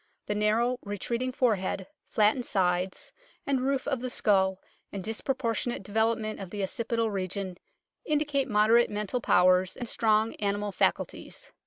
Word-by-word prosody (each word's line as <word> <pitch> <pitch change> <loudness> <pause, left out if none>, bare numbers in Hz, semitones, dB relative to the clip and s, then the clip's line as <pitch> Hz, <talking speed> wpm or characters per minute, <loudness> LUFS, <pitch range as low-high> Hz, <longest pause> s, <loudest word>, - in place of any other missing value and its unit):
The - - -1
narrow 225 +4 +1
retreating 235 +5 -3
fore 245 -4 +2
head, 190 0 -3 0.2
flattened 220 +4 +2
sides 180 -2 0 0.3
and 270 -2 +1
roof 270 +1 -1
of 270 -3 0
the 255 +1 -4
skull, 190 -5 +2 0.3
and 195 -2 -5
disproportionate 230 0 -2
development 220 +1 0
of 195 -2 -7
the 205 +1 -4
occipital 230 +2 -1
region 190 -1 -4 0.4
indicate 295 -2 0
moderate 220 +3 +4
mental 210 +4 -2
powers 185 -1 +3
and 245 - -4
strong 220 0 +2
animal 205 0 -1
faculties. - - -2
215 Hz, 140 wpm, -28 LUFS, 195-240 Hz, 0.4 s, moderate